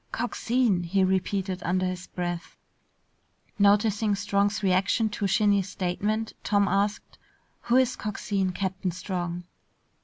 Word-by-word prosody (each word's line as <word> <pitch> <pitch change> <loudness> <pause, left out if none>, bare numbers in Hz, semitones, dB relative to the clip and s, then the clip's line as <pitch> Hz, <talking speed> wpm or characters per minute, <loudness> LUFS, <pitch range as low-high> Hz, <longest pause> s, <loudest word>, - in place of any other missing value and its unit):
"Coxine!" 235 -4 0
he 190 +3 +1
repeated 190 0 0
under 185 +2 +1
his 185 -1 -4
breath. 175 -1 -5 1.0
Noticing 205 +1 +3
Strong's 205 +1 0
reaction 195 +4 +2
to 210 -1 -2
Shinny's 200 -1 +2
statement, 205 +4 -2
Tom 205 -1 +2
asked, 200 +2 -1 0.5
"Who 240 - +4
is 260 -1 +3
Coxine, 200 -2 -2
Captain 190 0 -2
Strong?" 175 -1 -4
200 Hz, 115 wpm, -26 LUFS, 185-210 Hz, 1.0 s, Who